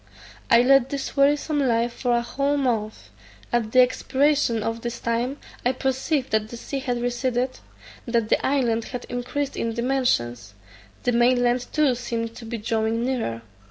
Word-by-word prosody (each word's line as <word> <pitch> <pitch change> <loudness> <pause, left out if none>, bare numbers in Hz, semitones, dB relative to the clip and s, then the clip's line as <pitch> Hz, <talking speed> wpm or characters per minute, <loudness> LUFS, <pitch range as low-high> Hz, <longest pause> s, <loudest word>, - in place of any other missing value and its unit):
I 235 +1 +6
led 270 0 +5
this 280 -2 -4
wearisome 290 +2 +2
life 235 -3 +1
for 245 -1 0
a 235 0 +2
whole 280 +4 0
month. 225 -6 -2 0.4
At 230 -2 +1
the 255 - +7
expiration 265 -2 +2
of 225 +1 -3
this 235 0 -4
time 235 +4 -1 0.3
I 250 - +2
perceived 265 +2 -1
that 215 0 +1
the 235 - -7
sea 275 +3 -4
had 250 -3 -2
receded; 245 +1 -1 0.5
that 230 -2 0
the - - +2
island 235 -5 +1
had 250 -1 -6
increased 255 +3 -3
in 230 -1 -2
dimensions; 125 - 0 0.5
the 245 - +2
main 245 +1 +3
land 245 0 +1
too 300 -4 +3
seemed 230 -2 -4
to 235 - -9
be 230 +1 -4
drawing 225 +2 -1
nearer. 225 - -2
245 Hz, 165 wpm, -24 LUFS, 230-265 Hz, 0.5 s, the